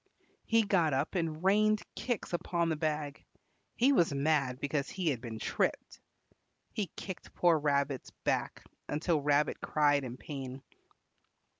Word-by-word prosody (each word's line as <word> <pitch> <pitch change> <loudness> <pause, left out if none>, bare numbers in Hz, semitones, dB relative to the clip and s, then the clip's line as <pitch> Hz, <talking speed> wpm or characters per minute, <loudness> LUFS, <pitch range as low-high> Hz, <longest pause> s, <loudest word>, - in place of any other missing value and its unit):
He 225 0 +4
got 170 -8 +2
up 140 +4 -1
and 165 -3 -2
rained 215 +2 +3
kicks 240 -7 -3
upon 170 -1 0
the 160 - +1
bag. 150 -2 -2 0.5
He 260 +4 +4
was 175 - +3
mad 140 -3 +1
because 140 0 -1
he 185 -4 -1
had 125 -6 -1
been 115 -3 -6
tripped. - - -1 0.7
He 205 -3 -1
kicked 190 -3 -8
poor 170 -3 +4
Rabbit's 140 -2 0
back - - -1 0.3
until 155 +1 +1
Rabbit 145 +1 +2
cried 145 -2 +2
in 125 -1 -6
pain. 135 -2 -7
155 Hz, 140 wpm, -32 LUFS, 140-175 Hz, 0.7 s, He